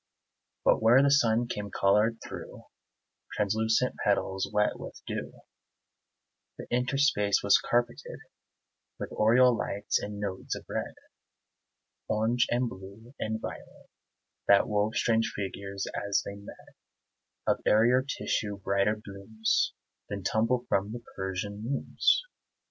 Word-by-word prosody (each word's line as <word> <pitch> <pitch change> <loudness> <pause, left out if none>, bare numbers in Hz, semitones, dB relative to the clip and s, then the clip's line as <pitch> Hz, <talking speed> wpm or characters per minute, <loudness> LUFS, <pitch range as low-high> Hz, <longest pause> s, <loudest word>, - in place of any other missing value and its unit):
But - - +4
where 120 +5 +6
the 140 - +4
sun 120 -4 +3
came 105 -3 -4
colored 105 +4 +2
through - - -9 0.7
Translucent 110 +4 +1
petals 95 -1 0
wet 105 0 +1
with - - -9
dew, - - -4 1.3
The - - -7
interspace 125 -4 +2
was 100 0 +5
carpeted 120 0 -1 0.8
With - - -6
oriel 120 +3 +5
lights 100 -2 -1
and 105 0 -6
nodes 100 -2 -3
of - - -9
red, - - -4 1.1
Orange 115 +3 +1
and 120 +1 +1
blue 100 +4 -11
and 110 0 -2
violet, - - -9 0.6
That 100 0 +5
wove 105 +1 0
strange 115 -1 +2
figures, 100 0 -4
as 100 0 0
they 100 - -5
met, 100 0 -12 0.8
Of - - +2
airier 120 +4 +5
tissue, 110 -6 -2
brighter 100 +2 +1
blooms 105 +1 -1 0.3
Than 100 -1 -5
tumble 115 +5 +1
from 100 -1 0
the 120 0 -7
Persian 95 +2 -4
looms. 135 - +1
110 Hz, 120 wpm, -29 LUFS, 100-120 Hz, 1.3 s, where